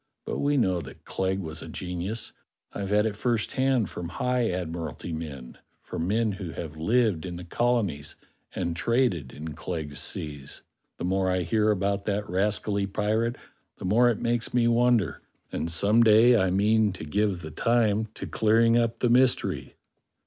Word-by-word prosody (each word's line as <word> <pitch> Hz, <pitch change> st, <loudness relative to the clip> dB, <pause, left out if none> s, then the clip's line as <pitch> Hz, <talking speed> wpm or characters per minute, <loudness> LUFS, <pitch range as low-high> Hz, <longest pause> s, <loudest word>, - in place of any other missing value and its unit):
But -, -, -3 dB
we 145 Hz, 0 st, +2 dB
know 95 Hz, -8 st, +2 dB
that 70 Hz, -, -12 dB
Clegg 95 Hz, 0 st, -1 dB
was 80 Hz, -2 st, -6 dB
a -, -, -8 dB
genius. 90 Hz, +5 st, -5 dB, 0.4 s
I've 100 Hz, -1 st, -4 dB
had 105 Hz, +1 st, +3 dB
it 110 Hz, -2 st, -1 dB
first 115 Hz, -1 st, 0 dB
hand 130 Hz, -5 st, +1 dB
from 85 Hz, -1 st, -6 dB
high 125 Hz, +5 st, 0 dB
Admiralty 85 Hz, -1 st, -4 dB
men; 70 Hz, -6 st, -7 dB, 0.2 s
from 85 Hz, -, -4 dB
men 110 Hz, +2 st, +1 dB
who 95 Hz, -4 st, -6 dB
have 80 Hz, -2 st, -6 dB
lived 105 Hz, 0 st, +1 dB
in 90 Hz, -1 st, -5 dB
the 90 Hz, -, -7 dB
colonies 100 Hz, -6 st, -1 dB, 0.4 s
and 85 Hz, -1 st, -2 dB
traded 100 Hz, -, +1 dB
in 75 Hz, +1 st, -7 dB
Clegg's 75 Hz, -1 st, -5 dB
seas. 75 Hz, -3 st, -5 dB, 0.3 s
The -, -, -6 dB
more 95 Hz, +1 st, +1 dB
I 90 Hz, -1 st, +1 dB
hear 110 Hz, +2 st, +2 dB
about 100 Hz, -1 st, 0 dB
that 105 Hz, 0 st, -1 dB
rascally 100 Hz, +2 st, 0 dB
pirate 110 Hz, +4 st, 0 dB, 0.4 s
the -, -, -7 dB
more 120 Hz, +6 st, +4 dB
it 115 Hz, -, 0 dB
makes 120 Hz, 0 st, -1 dB
me 120 Hz, -1 st, +4 dB
wonder; 120 Hz, -, +2 dB, 0.3 s
and 85 Hz, -, -2 dB
some 100 Hz, +7 st, +4 dB
day 115 Hz, +2 st, +6 dB
I 95 Hz, -5 st, +3 dB
mean 105 Hz, +2 st, +3 dB
to 95 Hz, -, -8 dB
give 100 Hz, +2 st, 0 dB
the 80 Hz, -1 st, -7 dB
time 110 Hz, +3 st, +2 dB
to -, -, -6 dB
clearing 115 Hz, +2 st, +3 dB
up 115 Hz, 0 st, -1 dB
the 125 Hz, -, +3 dB
mystery." 100 Hz, -, +2 dB
100 Hz, 170 wpm, -27 LUFS, 85-115 Hz, 0.4 s, day